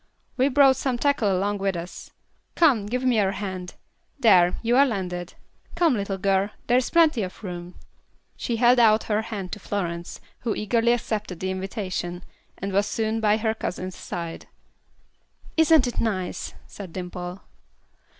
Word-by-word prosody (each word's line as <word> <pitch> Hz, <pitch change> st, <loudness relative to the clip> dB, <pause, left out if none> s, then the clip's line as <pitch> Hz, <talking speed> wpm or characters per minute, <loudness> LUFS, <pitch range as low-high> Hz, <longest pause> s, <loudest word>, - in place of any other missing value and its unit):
We 265 Hz, +2 st, +3 dB
brought 270 Hz, -1 st, +5 dB
some 260 Hz, -2 st, -1 dB
tackle 240 Hz, -6 st, +2 dB
along 200 Hz, +2 st, 0 dB
with 195 Hz, -1 st, 0 dB
us. 170 Hz, +1 st, -7 dB, 0.5 s
Come, 260 Hz, -12 st, +4 dB
give 250 Hz, +4 st, -2 dB
me 250 Hz, -3 st, +3 dB
your 195 Hz, -1 st, +2 dB
hand. 185 Hz, -3 st, -5 dB, 0.4 s
There, 185 Hz, -8 st, +5 dB
you 235 Hz, +1 st, +2 dB
are 275 Hz, -, +7 dB
landed. 180 Hz, -6 st, -4 dB, 0.4 s
Come, 340 Hz, -4 st, +3 dB
little 200 Hz, -3 st, -2 dB
girl, 195 Hz, +1 st, +1 dB, 0.2 s
there 245 Hz, +1 st, +4 dB
is 255 Hz, -, -3 dB
plenty 320 Hz, -8 st, +4 dB
of 190 Hz, +3 st, -6 dB
room." 175 Hz, -2 st, -7 dB, 0.6 s
She 235 Hz, -, -2 dB
held 245 Hz, +2 st, +5 dB
out 220 Hz, -2 st, +5 dB
her 215 Hz, 0 st, 0 dB
hand 205 Hz, -5 st, -6 dB
to 210 Hz, -, -5 dB
Florence, 175 Hz, -4 st, -4 dB, 0.2 s
who 230 Hz, -3 st, -2 dB
eagerly 230 Hz, +2 st, +2 dB
accepted 215 Hz, -6 st, -3 dB
the 190 Hz, 0 st, -2 dB
invitation, 185 Hz, -2 st, -4 dB, 0.3 s
and 195 Hz, 0 st, -4 dB
was 200 Hz, +2 st, +2 dB
soon 220 Hz, 0 st, -1 dB
by 215 Hz, -1 st, +3 dB
her 220 Hz, 0 st, 0 dB
cousin's 185 Hz, -4 st, -5 dB
side. 170 Hz, -1 st, -6 dB, 1.1 s
"Isn't 320 Hz, -4 st, +5 dB
it 245 Hz, -, -3 dB
nice?" 190 Hz, -5 st, -3 dB
said 190 Hz, -5 st, -10 dB
Dimple. 180 Hz, 0 st, -6 dB
205 Hz, 160 wpm, -25 LUFS, 185-240 Hz, 1.1 s, are